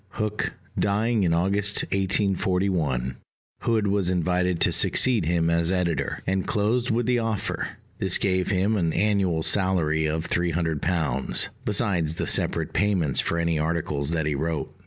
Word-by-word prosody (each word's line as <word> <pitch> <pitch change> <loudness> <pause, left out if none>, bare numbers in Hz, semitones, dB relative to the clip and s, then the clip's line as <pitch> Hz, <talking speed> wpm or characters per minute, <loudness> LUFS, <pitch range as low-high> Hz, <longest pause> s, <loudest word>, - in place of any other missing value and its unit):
Hook 105 -1 -2 0.3
dying 110 +3 +1
in 90 -3 +2
August 100 +4 +1
1841, 95 - 0 0.4
Hood 110 -3 0
was 100 -2 +1
invited 90 0 0
to - - +3
succeed 120 -9 +3
him 85 -1 +1
as 85 +1 +1
editor, 90 -3 -1
and 95 0 -1
closed 115 +4 0
with 115 +1 +1
the 125 0 +2
offer: 110 -3 -3 0.2
this 95 -2 +1
gave 95 -2 0
him 100 +3 +1
an 85 -4 0
annual 95 -5 +1
salary 80 -6 +1
of 80 +2 -2
£300, 85 -3 0 0.2
besides 95 - 0
the - - -2
separate - - +1
payments 95 -9 +1
for 85 - 0
any 85 -2 0
articles 75 -3 -2
that 80 -2 -1
he 75 - 0
wrote. 80 +2 -3
90 Hz, 145 wpm, -25 LUFS, 80-100 Hz, 0.4 s, to